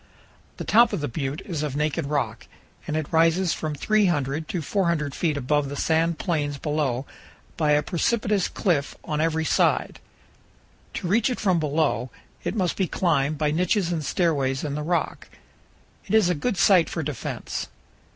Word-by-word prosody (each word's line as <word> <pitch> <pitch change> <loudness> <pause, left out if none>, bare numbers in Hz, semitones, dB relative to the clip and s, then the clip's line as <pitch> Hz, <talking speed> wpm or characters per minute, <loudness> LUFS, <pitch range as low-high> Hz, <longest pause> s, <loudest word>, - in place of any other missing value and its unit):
The - - -4
top 235 0 +5
of 200 - -1
the 145 - -1
butte 140 +5 -4
is 165 -6 -3
of 150 -3 -3
naked 150 +1 -1
rock, 150 0 -2 0.4
and 155 - -1
it 155 - -1
rises 165 +2 +3
from 155 -1 -3
300 155 -6 +1
to 180 - -2
400 170 -5 0
feet 155 -4 0
above 140 +1 0
the 145 - -5
sand 165 +2 +1
plains 150 -5 -1
below 145 -4 -1 0.5
by 150 -2 +2
a 150 0 +3
precipitous 205 +3 0
cliff 155 -8 -1
on 150 0 -2
every 160 0 0
side. - - +1 1.0
To 180 - -3
reach 215 +6 +3
it 250 - -3
from 185 -5 +2
below, 150 -5 0 0.3
it - - -2
must 185 -5 0
be 190 - +1
climbed 155 -5 +1
by 150 0 +1
niches 180 +3 +1
and 165 -3 -2
stairways 140 -5 0
in 145 -2 -3
the 150 - -3
rock. 170 +3 -2 0.8
It - - +1
is 210 -5 +5
a - - +2
good 195 +6 -2
site 180 -2 +5
for 165 - -3
defense. 140 -6 -4
160 Hz, 170 wpm, -25 LUFS, 145-180 Hz, 1.0 s, top